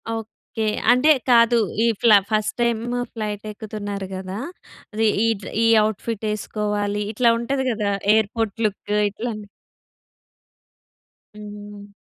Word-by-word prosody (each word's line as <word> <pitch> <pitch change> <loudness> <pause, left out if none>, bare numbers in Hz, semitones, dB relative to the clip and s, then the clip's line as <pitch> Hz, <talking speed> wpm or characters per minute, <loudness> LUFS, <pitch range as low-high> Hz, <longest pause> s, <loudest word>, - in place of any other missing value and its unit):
Okay. 225 0 -6 0.3
అంటే 255 +5 +4 0.2
కాదు 235 0 +5 0.3
ఈ - - +3
ఫ్లా 220 -3 +7
ఫస్ట్ 215 -1 0
టైమ్ 235 -2 +1 0.3
ఫ్లైట్ 210 -2 -4
ఎక్కుతున్నారు 205 -2 -6
కదా! 185 +1 -6 0.6
అది 220 +1 +1 0.2
ఈ - - +3 0.4
ఈ - - +5 0.2
అవుట్‌ఫిట్ 220 +1 -3
వేసుకోవాలి. 210 -1 -2
ఇట్లా 235 +1 +4
ఉంటది 265 +2 -1
కదా! 210 -2 -1 0.2
Airport 220 0 -1
look 205 0 -3 0.2
ఇట్లాని. 215 0 -6 1.9
హ్మ్. 205 -1 -10
215 Hz, 110 wpm, -22 LUFS, 205-230 Hz, 1.9 s, ఫ్లా